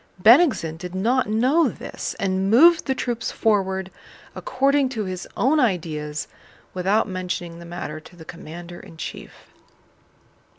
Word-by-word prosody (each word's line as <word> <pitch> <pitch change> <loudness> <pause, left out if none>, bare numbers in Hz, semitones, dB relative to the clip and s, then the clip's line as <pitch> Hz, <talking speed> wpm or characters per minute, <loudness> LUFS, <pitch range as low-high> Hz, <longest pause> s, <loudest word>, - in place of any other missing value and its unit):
Bennigsen 225 - +5
did 180 +1 -8
not 235 +5 +1
know 255 +10 +3
this - - -6
and 190 0 0
moved 320 +10 +6
the 265 - +1
troops 240 -3 -3
forward 190 -3 0 0.4
according 280 - +1
to 230 -5 -3
his 185 -1 -5
own 290 +5 +3
ideas 155 - -1 0.5
without 195 +5 +1
mentioning 180 -3 -4
the 170 - -10
matter 170 -3 -6
to 160 - -16
the 165 -2 -13
commander 170 +1 -9
in 165 - -14
chief. - - -9
190 Hz, 135 wpm, -23 LUFS, 175-250 Hz, 0.5 s, moved